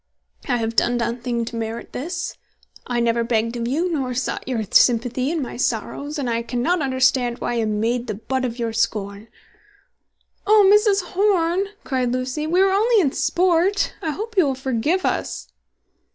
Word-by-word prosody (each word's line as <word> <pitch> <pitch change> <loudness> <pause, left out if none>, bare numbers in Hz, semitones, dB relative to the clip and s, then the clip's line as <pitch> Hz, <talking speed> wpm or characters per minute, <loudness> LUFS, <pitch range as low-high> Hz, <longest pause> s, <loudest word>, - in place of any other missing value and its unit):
"I 245 - +2
have 225 0 -2
done 240 +2 +2
nothing 235 0 -2
to 235 - -7
merit 230 0 -5
this. 345 +6 -4 0.5
I 245 -1 -1
never 235 0 +1
begged 230 0 0
of 235 -1 -2
you, 310 +8 0
nor 260 -5 -2
sought 255 - -3
your 240 -4 -1
sympathy 245 +2 +3
in 320 -2 -1
my 245 - -7
sorrows, 270 +5 -2
and 275 -3 -2
I 230 -1 0
cannot 250 +9 -1
understand 260 -2 +1
why - - -3
I - - -1
am 215 -2 0
made 235 +2 -1
the - - -3
butt 260 +5 -3
of 240 -2 -3
your 230 -2 -2
scorn." 205 -1 -2 1.2
"Oh, 420 -1 +6
Mrs. 415 -4 +3
Horn," 375 -2 +2 0.2
cried 255 -3 -1
Lucy, 255 +4 -2
"we 360 +4 +3
were 390 - +3
only 440 +4 +3
in 295 -8 +2
sport! 365 +5 +1
I 320 - -2
hope 435 +9 -5
you 370 -5 +5
will 270 - -1
forgive 265 +7 -1
us." - - -2
255 Hz, 180 wpm, -22 LUFS, 235-340 Hz, 1.2 s, Oh